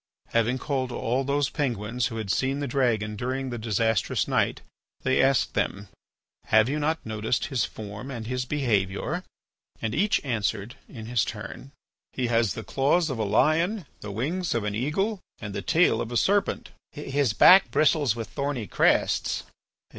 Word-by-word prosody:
Having 115 Hz, +2 st, +1 dB
called 130 Hz, -2 st, -2 dB
all 125 Hz, +3 st, -1 dB
those 140 Hz, 0 st, 0 dB
Penguins 120 Hz, -4 st, -1 dB
who 115 Hz, -, -6 dB
had 105 Hz, -4 st, -2 dB
seen 135 Hz, +5 st, 0 dB
the 145 Hz, -, -2 dB
dragon 120 Hz, -5 st, 0 dB
during 130 Hz, +3 st, -3 dB
the 120 Hz, -, -4 dB
disastrous 110 Hz, -1 st, 0 dB
night, -, -, 0 dB, 0.4 s
they 130 Hz, 0 st, +3 dB
asked 135 Hz, -2 st, +2 dB
them: 100 Hz, 0 st, -2 dB, 0.6 s
"Have 110 Hz, +1 st, +4 dB
you 145 Hz, +3 st, -1 dB
not 160 Hz, +2 st, -1 dB
noticed 110 Hz, +1 st, -1 dB
his 130 Hz, -6 st, 0 dB
form 105 Hz, +4 st, -8 dB
and 115 Hz, -4 st, -6 dB
his 125 Hz, +2 st, -2 dB
behaviour?" 125 Hz, -, -1 dB, 0.6 s
And 110 Hz, -1 st, -2 dB
each 205 Hz, -, +2 dB
answered 110 Hz, -2 st, -2 dB, 0.2 s
in 110 Hz, -4 st, -9 dB
his 120 Hz, +1 st, +1 dB
turn: 110 Hz, +5 st, -7 dB, 0.4 s
"He 130 Hz, -, -1 dB
has 115 Hz, -3 st, +2 dB
the -, -, -5 dB
claws 145 Hz, +4 st, +1 dB
of 125 Hz, -, -4 dB
a -, -, +1 dB
lion, 160 Hz, -, +2 dB
the 105 Hz, -, -7 dB
wings 160 Hz, -, -2 dB
of 115 Hz, -, 0 dB
an 105 Hz, 0 st, -2 dB
eagle, 175 Hz, -, -1 dB, 0.2 s
and 105 Hz, -1 st, -7 dB
the 100 Hz, -, -3 dB
tail 115 Hz, -, +3 dB
of 115 Hz, -, -5 dB
a 120 Hz, -, 0 dB
serpent." 200 Hz, -, +1 dB, 0.2 s
"His 140 Hz, -5 st, -1 dB
back 190 Hz, -, +7 dB
bristles 145 Hz, -6 st, +3 dB
with 115 Hz, -2 st, -5 dB
thorny 140 Hz, -5 st, -3 dB
crests." -, -, +1 dB
125 Hz, 170 wpm, -26 LUFS, 110-145 Hz, 0.6 s, back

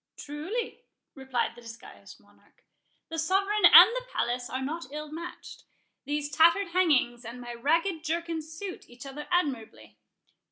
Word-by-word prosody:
"Truly," 370 Hz, +12 st, -5 dB, 0.3 s
replied 265 Hz, -3 st, -2 dB
the 240 Hz, -, -15 dB
disguised 230 Hz, -1 st, -13 dB
Monarch, -, -, -28 dB, 0.5 s
"the 325 Hz, 0 st, -4 dB
sovereign 390 Hz, +5 st, +1 dB
and -, -, +10 dB
the -, -, -5 dB
palace 245 Hz, 0 st, -2 dB
are 260 Hz, -, -3 dB
not 300 Hz, +4 st, -5 dB
ill 300 Hz, 0 st, -7 dB
matched;—these 300 Hz, -3 st, -8 dB
tattered 335 Hz, +5 st, +4 dB
hangings 295 Hz, -9 st, +1 dB
and 235 Hz, +2 st, -8 dB
my 240 Hz, -1 st, -7 dB
ragged 325 Hz, +7 st, 0 dB
jerkin 335 Hz, 0 st, -2 dB
suit 320 Hz, +5 st, -9 dB
each 245 Hz, +3 st, -12 dB
other 275 Hz, +2 st, -8 dB
admirably. 285 Hz, -11 st, -3 dB
305 Hz, 135 wpm, -28 LUFS, 255-340 Hz, 0.5 s, and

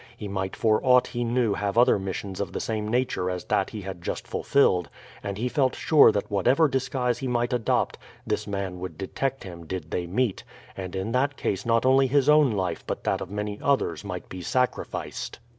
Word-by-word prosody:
He 105 Hz, -, -6 dB
might 95 Hz, -1 st, -3 dB
for 110 Hz, -2 st, +2 dB
aught 125 Hz, -1 st, +5 dB
he 120 Hz, -, -3 dB
knew 120 Hz, -2 st, +1 dB
have 100 Hz, +1 st, -2 dB
other 120 Hz, -4 st, +5 dB
missions 95 Hz, 0 st, -4 dB
of 100 Hz, -, -4 dB
the -, -, -2 dB
same 110 Hz, -2 st, -2 dB
nature 120 Hz, -5 st, 0 dB
as 90 Hz, -2 st, -3 dB
that -, -, 0 dB
he 105 Hz, -, -6 dB
had 95 Hz, -2 st, -7 dB
just -, -, -4 dB
fulfilled, 90 Hz, -, +2 dB, 0.3 s
and 100 Hz, -1 st, -4 dB
he 120 Hz, +4 st, -1 dB
felt 130 Hz, 0 st, +1 dB
sure 150 Hz, -7 st, +6 dB
that 105 Hz, -1 st, -3 dB
whatever 125 Hz, -, +4 dB
disguise 130 Hz, -2 st, -1 dB
he 135 Hz, -, -3 dB
might 120 Hz, 0 st, 0 dB
adopt 120 Hz, -3 st, 0 dB, 0.3 s
this -, -, -2 dB
man 100 Hz, -3 st, -3 dB
would 90 Hz, -4 st, -6 dB
detect 135 Hz, +7 st, -3 dB
him 85 Hz, -3 st, -9 dB
did 85 Hz, -4 st, -5 dB
they 90 Hz, -1 st, -2 dB
meet, 105 Hz, +3 st, 0 dB, 0.3 s
and 95 Hz, -1 st, -6 dB
in 95 Hz, +4 st, -2 dB
that 135 Hz, +3 st, +1 dB
case 100 Hz, +3 st, -2 dB
not 115 Hz, +1 st, +3 dB
only 135 Hz, +1 st, +5 dB
his 140 Hz, +1 st, +2 dB
own 150 Hz, -3 st, +6 dB
life 95 Hz, -4 st, -2 dB
but -, -, -4 dB
that -, -, 0 dB
of -, -, -5 dB
many 105 Hz, 0 st, -4 dB
others 130 Hz, -, +1 dB
might -, -, -6 dB
be 95 Hz, -, -8 dB
sacrificed. 125 Hz, +7 st, -2 dB
110 Hz, 210 wpm, -26 LUFS, 95-125 Hz, 0.3 s, sure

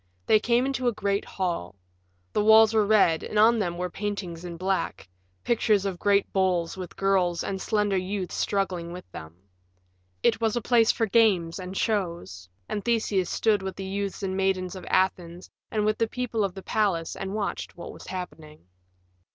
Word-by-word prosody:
They 215 Hz, -, +5 dB
came 240 Hz, +3 st, +2 dB
into 265 Hz, -2 st, -1 dB
a -, -, +4 dB
great 200 Hz, -1 st, -1 dB
hall. 170 Hz, -, -3 dB, 0.6 s
The 210 Hz, -, +2 dB
walls 220 Hz, 0 st, +7 dB
were 215 Hz, -2 st, +3 dB
red 195 Hz, -7 st, +4 dB
and 215 Hz, -, -4 dB
on 225 Hz, +2 st, +5 dB
them 175 Hz, -4 st, -2 dB
were 180 Hz, 0 st, -3 dB
paintings 195 Hz, -5 st, -4 dB
in 170 Hz, -1 st, -7 dB
black 190 Hz, -, -2 dB, 0.4 s
pictures 215 Hz, -4 st, +2 dB
of 190 Hz, -3 st, -3 dB
great 200 Hz, -1 st, +2 dB
bulls 185 Hz, -3 st, +1 dB
with 185 Hz, -2 st, -8 dB
girls 185 Hz, -3 st, +1 dB
and 190 Hz, -1 st, -4 dB
slender 210 Hz, -3 st, +1 dB
youths 185 Hz, 0 st, -3 dB
struggling 180 Hz, -4 st, -1 dB
with 180 Hz, 0 st, -9 dB
them. 80 Hz, +1 st, -9 dB, 0.9 s
It 225 Hz, -, +2 dB
was 225 Hz, -1 st, +1 dB
a -, -, +1 dB
place 230 Hz, 0 st, +4 dB
for 225 Hz, -, 0 dB
games 195 Hz, -6 st, +2 dB
and 185 Hz, +1 st, -6 dB
shows, 170 Hz, -, -2 dB, 0.2 s
and 205 Hz, -, -3 dB
Theseus 215 Hz, -6 st, +1 dB
stood 215 Hz, -3 st, +2 dB
with 190 Hz, 0 st, -5 dB
the 195 Hz, -, -6 dB
youths 200 Hz, +1 st, -4 dB
and 190 Hz, -1 st, -2 dB
maidens 190 Hz, -1 st, 0 dB
of 185 Hz, -, -9 dB
Athens 180 Hz, -2 st, 0 dB, 0.2 s
and 210 Hz, -1 st, 0 dB
with 215 Hz, 0 st, +1 dB
the 230 Hz, -, +2 dB
people 230 Hz, -2 st, -2 dB
of 195 Hz, -2 st, -2 dB
the 190 Hz, -, -8 dB
palace 195 Hz, -7 st, 0 dB
and 195 Hz, +1 st, -5 dB
watched 205 Hz, -4 st, -4 dB
what 170 Hz, -, -8 dB
was -, -, -12 dB
happening. 160 Hz, -, -8 dB
195 Hz, 185 wpm, -26 LUFS, 180-215 Hz, 0.9 s, walls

